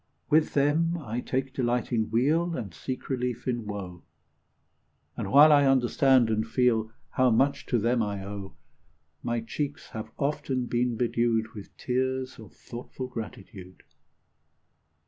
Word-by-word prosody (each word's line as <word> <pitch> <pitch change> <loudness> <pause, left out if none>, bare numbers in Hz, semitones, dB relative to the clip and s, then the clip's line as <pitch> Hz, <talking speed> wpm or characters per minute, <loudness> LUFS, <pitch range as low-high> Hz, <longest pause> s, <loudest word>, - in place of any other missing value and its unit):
With 155 +1 +3
them 155 +4 +2
I 120 -7 -4
take 130 +1 -2
delight 120 -2 -1
in 110 -2 +1
weal, 155 +9 +2
And 100 -8 -6
seek 130 +7 -6
relief 125 -2 -2
in 120 -4 -2
woe; 95 -4 -6 1.1
And - - -4
while 150 +3 +8
I 145 -1 +6
understand 130 -1 +4
and 110 0 +1
feel 115 -1 +1 0.2
How 130 0 +3
much 135 +5 +2
to 120 - +2
them 115 +2 +1
I 100 -2 -3
owe, 100 -1 -7 0.7
My 120 -1 -1
cheeks 145 +5 -4
have 110 0 -6
often 135 -3 -1
been 120 0 0
bedewed 115 -2 +1
With 105 -2 -11
tears 130 0 -2
of 110 -3 -12
thoughtful 125 +2 -8
gratitude. 100 -5 -9
120 Hz, 140 wpm, -27 LUFS, 110-135 Hz, 1.1 s, while